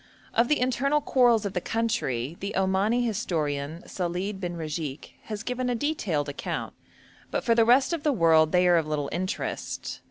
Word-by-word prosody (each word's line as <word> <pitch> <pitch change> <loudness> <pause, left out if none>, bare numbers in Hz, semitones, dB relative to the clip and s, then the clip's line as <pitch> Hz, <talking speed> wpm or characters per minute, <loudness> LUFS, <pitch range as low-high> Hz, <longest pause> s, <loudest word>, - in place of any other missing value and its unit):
Of 235 +1 +3
the 300 - +2
internal 260 +4 +2
quarrels 240 -6 +3
of 200 - -3
the 180 - -1
country, 160 - -1
the 200 +1 -4
Omani 195 +6 +2
historian 160 -8 -2
Salid 185 +2 -3
bin 175 -2 -4
Ragik 155 -3 -5
has 215 -1 -5
given 250 +1 -2
a 245 - +1
detailed 215 - -1
account, 145 - -4 0.6
but - - -2
for 235 - +3
the 230 -1 +4
rest 260 +7 +4
of 335 - -2
the 300 -1 +2
world 165 - +4
they 180 0 +4
are 175 -1 +5
of 160 -2 0
little 150 -2 -2
interest. 185 +3 -4
190 Hz, 180 wpm, -27 LUFS, 165-240 Hz, 0.6 s, are